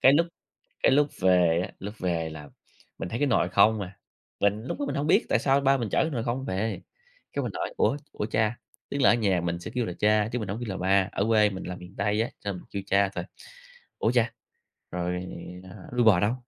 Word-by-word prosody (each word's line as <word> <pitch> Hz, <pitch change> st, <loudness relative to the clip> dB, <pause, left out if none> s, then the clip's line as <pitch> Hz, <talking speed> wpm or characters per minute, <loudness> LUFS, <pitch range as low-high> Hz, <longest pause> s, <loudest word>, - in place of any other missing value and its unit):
cái 135 Hz, -, +7 dB
lúc 165 Hz, +4 st, +4 dB, 0.6 s
cái -, -, +5 dB
lúc 145 Hz, +1 st, +4 dB
về 90 Hz, -2 st, +4 dB
á, -, -, -8 dB
lúc 100 Hz, +2 st, -6 dB
về 85 Hz, -3 st, -1 dB
là 75 Hz, -2 st, -9 dB, 0.5 s
mình -, -, -4 dB
thấy 115 Hz, -, -3 dB
cái 145 Hz, -, +2 dB
nồi -, -, +2 dB
không 105 Hz, +2 st, +4 dB
à. 95 Hz, -1 st, -7 dB, 0.4 s
Mình 105 Hz, +2 st, +1 dB
lúc 135 Hz, -, -4 dB
đó 285 Hz, -, -1 dB
mình -, -, -2 dB
hông 145 Hz, +2 st, -1 dB
biết -, -, +4 dB
tại -, -, +3 dB
sao 135 Hz, +2 st, +3 dB
ba 135 Hz, 0 st, +4 dB
mình 120 Hz, -4 st, -2 dB
chở -, -, +3 dB
cái 160 Hz, -, -1 dB
nồi 120 Hz, -6 st, -2 dB
không 125 Hz, +3 st, -2 dB
về, 105 Hz, +1 st, -2 dB, 0.5 s
cái -, -, -1 dB
mình -, -, -3 dB
hỏi: -, -, -3 dB
"Ủa 140 Hz, -, +2 dB, 0.2 s
ủa 105 Hz, -, -3 dB
cha?" 110 Hz, +1 st, +1 dB, 0.3 s
Tức 140 Hz, -, -2 dB
là -, -, +7 dB
ở -, -, +5 dB
nhà 100 Hz, -7 st, +2 dB
mình 85 Hz, 0 st, -2 dB
sẽ 100 Hz, -, -7 dB
kêu 125 Hz, -2 st, +1 dB
là 90 Hz, -, -3 dB
cha 105 Hz, 0 st, +3 dB
chứ 125 Hz, -, 0 dB
mình 105 Hz, -5 st, -4 dB
hổng 100 Hz, -, -3 dB
kêu 120 Hz, -, -4 dB
là 95 Hz, -, -3 dB
ba, 95 Hz, +1 st, +3 dB
ở 100 Hz, -, 0 dB
quê 105 Hz, -2 st, +4 dB
mình 95 Hz, -2 st, -6 dB
là 90 Hz, 0 st, -5 dB
miền 90 Hz, +2 st, -12 dB
Tây 105 Hz, +2 st, +1 dB
á, 115 Hz, -, -2 dB
cho 100 Hz, -, -3 dB
mình 90 Hz, -, -8 dB
kêu 100 Hz, -, -4 dB
cha 100 Hz, 0 st, +3 dB
thôi. -, -, -3 dB, 0.7 s
"Ủa 110 Hz, -, +2 dB
cha, 120 Hz, -2 st, +2 dB, 0.6 s
rồi, 90 Hz, +1 st, -2 dB, 0.4 s
ờ, 95 Hz, 0 st, -12 dB
đuôi 125 Hz, -1 st, +2 dB
bò 100 Hz, -6 st, +6 dB
đâu?" 105 Hz, +4 st, +2 dB
105 Hz, 255 wpm, -27 LUFS, 95-120 Hz, 0.7 s, cái